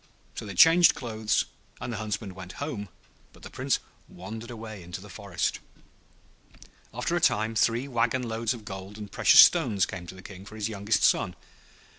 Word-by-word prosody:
So -, -, -7 dB
they 100 Hz, -, -7 dB
changed 165 Hz, -, +7 dB
clothes, 110 Hz, -3 st, -1 dB, 0.3 s
and 120 Hz, -, -5 dB
the -, -, -4 dB
Huntsman 105 Hz, -2 st, -4 dB
went 90 Hz, -1 st, -9 dB
home, 105 Hz, -5 st, -5 dB, 0.4 s
but -, -, -19 dB
the -, -, -9 dB
Prince -, -, 0 dB, 0.3 s
wandered 110 Hz, +6 st, -8 dB
away 110 Hz, -4 st, -8 dB
into 90 Hz, +2 st, -7 dB
the 100 Hz, +1 st, -12 dB
forest. 90 Hz, -2 st, -3 dB, 1.3 s
After -, -, -2 dB
a -, -, 0 dB
time 110 Hz, +2 st, +2 dB
three 115 Hz, +4 st, +1 dB
wagon 125 Hz, 0 st, 0 dB
loads 115 Hz, 0 st, -2 dB
of 110 Hz, -3 st, -12 dB
gold 95 Hz, 0 st, -8 dB
and 105 Hz, -2 st, -8 dB
precious -, -, +7 dB
stones 100 Hz, -3 st, +4 dB
came 90 Hz, -2 st, -8 dB
to 95 Hz, -, -9 dB
the 95 Hz, -, -13 dB
King 95 Hz, 0 st, -10 dB
for 110 Hz, +2 st, -12 dB
his 110 Hz, 0 st, -2 dB
youngest 105 Hz, +1 st, 0 dB
son. -, -, +3 dB
105 Hz, 180 wpm, -27 LUFS, 95-115 Hz, 1.3 s, changed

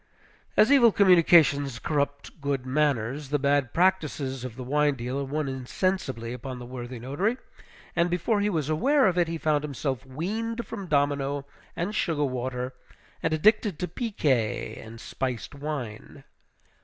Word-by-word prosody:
As 215 Hz, -, +6 dB
evil 245 Hz, -5 st, +7 dB
communications 165 Hz, -, +5 dB
corrupt 140 Hz, +2 st, -2 dB
good 140 Hz, -2 st, -1 dB
manners, 135 Hz, -1 st, 0 dB
the 145 Hz, -, +2 dB
bad 140 Hz, -2 st, +1 dB
practices 155 Hz, -8 st, +1 dB
of 125 Hz, -3 st, -6 dB
the 130 Hz, -, -6 dB
wine 145 Hz, +2 st, +2 dB
dealer 130 Hz, +3 st, -3 dB
won 145 Hz, +2 st, -2 dB
insensibly 130 Hz, -2 st, -2 dB
upon 125 Hz, +1 st, -6 dB
the 125 Hz, -, -8 dB
worthy 125 Hz, 0 st, -7 dB
notary; 145 Hz, -, -1 dB, 0.6 s
and 170 Hz, 0 st, +2 dB
before 205 Hz, +5 st, +1 dB
he 205 Hz, -, +2 dB
was 160 Hz, -7 st, -1 dB
aware 265 Hz, -, +3 dB
of 185 Hz, -3 st, +3 dB
it, 175 Hz, -, +3 dB
he 165 Hz, 0 st, -3 dB
found 150 Hz, -2 st, +1 dB
himself 135 Hz, -2 st, -3 dB
weaned 220 Hz, -, -3 dB
from 200 Hz, -2 st, -7 dB
domino 140 Hz, -1 st, 0 dB, 0.3 s
and 175 Hz, +5 st, -2 dB
sugar 160 Hz, -8 st, 0 dB
water, 125 Hz, 0 st, -3 dB, 0.5 s
and 165 Hz, -, 0 dB
addicted 205 Hz, +3 st, +3 dB
to 180 Hz, -, -2 dB
piquet 140 Hz, -, -1 dB
and 115 Hz, +1 st, -11 dB
spiced 125 Hz, +1 st, -4 dB
wine. 140 Hz, -7 st, -6 dB
145 Hz, 150 wpm, -27 LUFS, 130-175 Hz, 0.6 s, evil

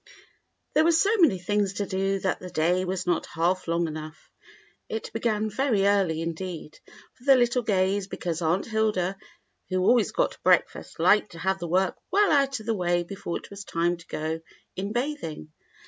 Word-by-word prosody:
There 310 Hz, -, +4 dB
were 335 Hz, -, +4 dB
so 390 Hz, +7 st, +3 dB
many 290 Hz, -, +5 dB
things 200 Hz, +2 st, 0 dB
to 200 Hz, +1 st, -2 dB
do 195 Hz, +1 st, 0 dB
that 190 Hz, -, -1 dB
the 180 Hz, -, -8 dB
day 175 Hz, +3 st, +1 dB
was 185 Hz, 0 st, -3 dB
not 175 Hz, -2 st, 0 dB
half 175 Hz, +4 st, 0 dB
long 170 Hz, 0 st, +1 dB
enough. 155 Hz, 0 st, -8 dB, 0.6 s
It 220 Hz, -, -5 dB
began 220 Hz, -2 st, 0 dB
very 215 Hz, -2 st, +1 dB
early, 195 Hz, -6 st, +2 dB
indeed, 165 Hz, -1 st, -6 dB, 0.3 s
for 245 Hz, -, -22 dB
the 275 Hz, -1 st, +7 dB
little 245 Hz, 0 st, +2 dB
Gays, 195 Hz, -2 st, +1 dB
because 170 Hz, -3 st, -4 dB
Aunt 170 Hz, +4 st, +1 dB
Hilda, 215 Hz, -4 st, 0 dB, 0.5 s
who 185 Hz, -1 st, 0 dB
always 230 Hz, +3 st, +3 dB
got -, -, -1 dB
breakfast, -, -, +1 dB
liked 210 Hz, -2 st, +3 dB
to -, -, -10 dB
have 190 Hz, +3 st, -1 dB
the 170 Hz, -, -4 dB
work 185 Hz, +2 st, +1 dB
well 405 Hz, +2 st, +3 dB
out 275 Hz, -3 st, +2 dB
of 215 Hz, -, -11 dB
the 225 Hz, -, +1 dB
way 175 Hz, -3 st, +1 dB
before 175 Hz, -1 st, -5 dB
it -, -, -13 dB
was 200 Hz, 0 st, -8 dB
time 175 Hz, -1 st, 0 dB
to 170 Hz, -, -16 dB
go 160 Hz, +1 st, -3 dB, 0.3 s
in 195 Hz, +2 st, -3 dB
bathing. 240 Hz, -, -4 dB
190 Hz, 185 wpm, -26 LUFS, 175-220 Hz, 0.6 s, the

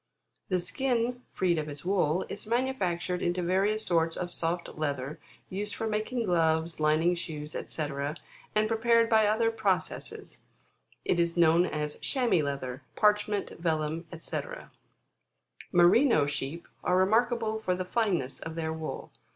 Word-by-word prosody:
The 185 Hz, -, +2 dB
skin, 245 Hz, +6 st, -1 dB
freed 175 Hz, -3 st, +1 dB
of 150 Hz, 0 st, -4 dB
its 145 Hz, +2 st, -8 dB
wool, 185 Hz, -2 st, +1 dB
is 205 Hz, -, -7 dB
manufactured 185 Hz, -8 st, 0 dB
into 175 Hz, +1 st, 0 dB
various 200 Hz, +5 st, +1 dB
sorts 165 Hz, -2 st, +1 dB
of 175 Hz, -1 st, -2 dB
soft 170 Hz, 0 st, -1 dB
leather, 145 Hz, -2 st, -3 dB, 0.3 s
used 205 Hz, +2 st, -3 dB
for 225 Hz, -, -3 dB
making 220 Hz, +3 st, -1 dB
gloves, 165 Hz, -2 st, +1 dB
lining 155 Hz, +3 st, +3 dB
shoes, 155 Hz, -3 st, -5 dB
&c., 155 Hz, -, -3 dB, 0.7 s
and 215 Hz, 0 st, +3 dB
prepared 230 Hz, +1 st, +3 dB
by 220 Hz, -1 st, +5 dB
other 225 Hz, +2 st, +2 dB
processes, 205 Hz, -5 st, -2 dB, 0.6 s
it 175 Hz, -, +2 dB
is 170 Hz, 0 st, +1 dB
known 170 Hz, +1 st, +5 dB
as 150 Hz, -1 st, -3 dB
chamois 245 Hz, -, +1 dB
leather, 135 Hz, -2 st, -4 dB
parchment, 210 Hz, -1 st, +2 dB
vellum, 160 Hz, 0 st, -1 dB
fyc. -, -, -6 dB, 1.0 s
Merino 175 Hz, -, +5 dB
sheep, 145 Hz, +3 st, -4 dB, 0.2 s
are 180 Hz, -, +2 dB
remarkable 220 Hz, +3 st, +2 dB
for 185 Hz, -4 st, 0 dB
the 185 Hz, 0 st, -3 dB
fineness 180 Hz, -, 0 dB
of 160 Hz, 0 st, -6 dB
their 160 Hz, -1 st, -2 dB
wool. 160 Hz, -1 st, -6 dB
180 Hz, 140 wpm, -29 LUFS, 160-215 Hz, 1.0 s, by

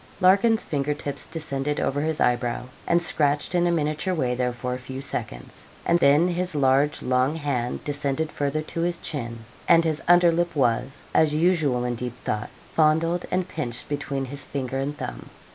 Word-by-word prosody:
Larkin's 200 Hz, +5 st, +4 dB
finger 145 Hz, -1 st, -1 dB
tips 145 Hz, -1 st, -6 dB
descended 150 Hz, -2 st, -3 dB
over 145 Hz, +1 st, 0 dB
his 155 Hz, 0 st, -1 dB
eyebrow, 120 Hz, 0 st, +1 dB, 0.2 s
and 170 Hz, -, +4 dB
scratched 145 Hz, -3 st, 0 dB
in 175 Hz, 0 st, +3 dB
a -, -, +2 dB
miniature 155 Hz, +3 st, 0 dB
way 125 Hz, -6 st, 0 dB
there 125 Hz, 0 st, 0 dB
for 125 Hz, +1 st, -4 dB
a 125 Hz, -, -4 dB
few 130 Hz, +1 st, -7 dB
seconds, -, -, -6 dB, 0.2 s
and 170 Hz, -, +3 dB
then 150 Hz, +4 st, +5 dB
his 180 Hz, -1 st, -2 dB
large 140 Hz, +1 st, +2 dB
long 130 Hz, +4 st, +2 dB
hand 140 Hz, -6 st, -2 dB
descended 145 Hz, +1 st, -2 dB
further 145 Hz, +2 st, -1 dB
to 165 Hz, -, -4 dB
his 175 Hz, 0 st, 0 dB
chin, 115 Hz, -8 st, -5 dB, 0.2 s
and 165 Hz, -, +6 dB
his 155 Hz, -2 st, -1 dB
under 175 Hz, 0 st, +6 dB
lip 170 Hz, +1 st, 0 dB
was, 130 Hz, +1 st, 0 dB
as 155 Hz, -1 st, +4 dB
usual 155 Hz, -7 st, +2 dB
in 125 Hz, -, -1 dB
deep 120 Hz, +1 st, -5 dB
thought, 105 Hz, 0 st, -2 dB, 0.2 s
fondled 165 Hz, +2 st, +2 dB
and 185 Hz, 0 st, 0 dB
pinched 125 Hz, -10 st, -4 dB
between 145 Hz, -2 st, -2 dB
his 135 Hz, +1 st, -8 dB
finger 135 Hz, -1 st, -3 dB
and 145 Hz, +2 st, -3 dB
thumb. -, -, -6 dB
145 Hz, 180 wpm, -25 LUFS, 130-165 Hz, 0.2 s, and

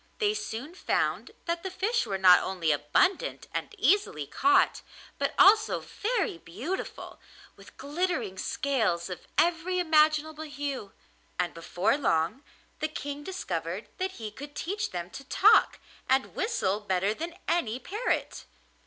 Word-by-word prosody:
They 420 Hz, -2 st, +2 dB
soon 305 Hz, -, -5 dB
found -, -, -1 dB, 0.2 s
that 340 Hz, 0 st, -1 dB
the 380 Hz, -, -4 dB
fish 395 Hz, +6 st, 0 dB
were 195 Hz, -, -1 dB
not 185 Hz, -1 st, +8 dB
only 180 Hz, -4 st, 0 dB
abundant 150 Hz, -, +1 dB
and -, -, -4 dB
easily 385 Hz, -, +2 dB
caught, 375 Hz, -, +3 dB, 0.4 s
but -, -, -1 dB
also 430 Hz, +3 st, +6 dB
very 420 Hz, -, -2 dB
beautiful, 295 Hz, -, -6 dB, 0.4 s
with -, -, -16 dB
glittering 285 Hz, -, -2 dB
scales 215 Hz, -11 st, 0 dB
of 180 Hz, -, -8 dB
every 345 Hz, +2 st, +2 dB
imaginable 310 Hz, -2 st, +3 dB
hue; 280 Hz, -8 st, -5 dB, 0.4 s
and 175 Hz, -1 st, -1 dB
before 175 Hz, -, 0 dB
long 170 Hz, -, +1 dB, 0.4 s
the 310 Hz, -, 0 dB
King 290 Hz, -1 st, -6 dB
discovered 375 Hz, +4 st, -4 dB
that 375 Hz, 0 st, -1 dB
he 220 Hz, -3 st, -7 dB
could 285 Hz, +6 st, -10 dB
teach 405 Hz, +8 st, -2 dB
them 175 Hz, 0 st, -5 dB
to 275 Hz, -, -8 dB
talk 410 Hz, +10 st, +5 dB, 0.3 s
and 265 Hz, 0 st, +2 dB
whistle 370 Hz, -, 0 dB
better 195 Hz, 0 st, 0 dB
than 335 Hz, +7 st, -6 dB
any 250 Hz, -10 st, +1 dB
parrot. 415 Hz, -, -2 dB
290 Hz, 135 wpm, -28 LUFS, -, 0.4 s, not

